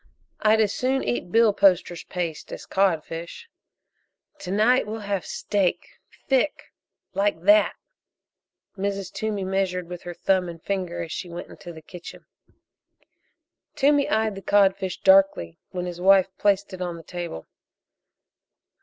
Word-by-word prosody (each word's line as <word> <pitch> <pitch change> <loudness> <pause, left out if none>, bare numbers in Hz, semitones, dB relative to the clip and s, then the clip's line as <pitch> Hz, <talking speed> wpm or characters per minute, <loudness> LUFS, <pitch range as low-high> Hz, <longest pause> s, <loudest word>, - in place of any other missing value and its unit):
"I'd 220 +1 +4
as 210 -2 +2
soon 265 +1 0
eat 120 +8 -2
billposter's 195 -6 +3
paste 170 -4 -4
as - - -7
codfish." 170 - -1 0.9
"To 180 - -8
night 215 +5 +3
we'll 220 +1 -5
have 200 -2 -3
steak 195 -4 -2 0.3
thick, 270 +2 0 0.4
like 195 -4 0
that 205 +2 +5 0.5
" - - -60
Mrs. 200 -1 -3
Toomey 215 -3 -2
measured 185 -2 -1
with 175 0 -7
her 175 -1 -7
thumb 185 -1 +1
and 165 -1 -9
finger 185 -1 -3
as 165 - -8
she 180 - -5
went 170 +1 -7
into 175 - -10
the 160 -1 -12
kitchen. 175 +2 -11 1.5
Toomey 285 0 +3
eyed 220 -1 +1
the 195 - -8
codfish 195 -2 +2
darkly 190 - +4
when 180 -1 -4
his 175 -1 -6
wife 190 0 +4
placed 200 -1 +1
it 185 - -7
on 175 -2 -3
the 165 - -11
table. 175 - -6
190 Hz, 140 wpm, -24 LUFS, 175-205 Hz, 1.5 s, that